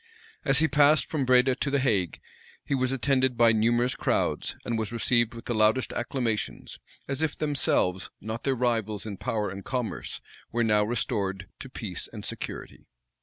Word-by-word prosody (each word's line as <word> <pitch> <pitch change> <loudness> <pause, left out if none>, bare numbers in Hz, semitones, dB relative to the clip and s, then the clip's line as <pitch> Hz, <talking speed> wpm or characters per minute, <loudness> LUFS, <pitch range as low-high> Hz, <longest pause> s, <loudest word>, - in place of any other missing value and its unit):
As 135 -1 +4
he 160 +2 +5
passed 145 -1 +4
from 145 -4 0
Breda 130 +1 +5
to 140 - -1
the 140 - +2
Hague, 105 - 0 0.5
he - - -2
was 130 -1 +1
attended 130 -1 +1
by 115 -1 +6
numerous 120 +3 +2
crowds, - - 0
and 120 - -1
was 110 -2 -2
received 120 0 +1
with 115 - -9
the 120 - -1
loudest 110 +3 +2
acclamations; 120 -3 -3 0.3
as 140 +1 -2
if 160 -2 -1
themselves, 115 -11 +1
not 110 +3 -5
their 135 -1 +1
rivals 115 -4 -1
in 105 -3 -5
power 105 -1 -2
and 100 0 -7
commerce, 125 -4 -4 0.3
were 120 0 +1
now 105 -2 +3
restored 100 -4 -2
to - - -8
peace - - -5
and - - -7
security. - - -6
120 Hz, 170 wpm, -27 LUFS, 110-130 Hz, 0.5 s, by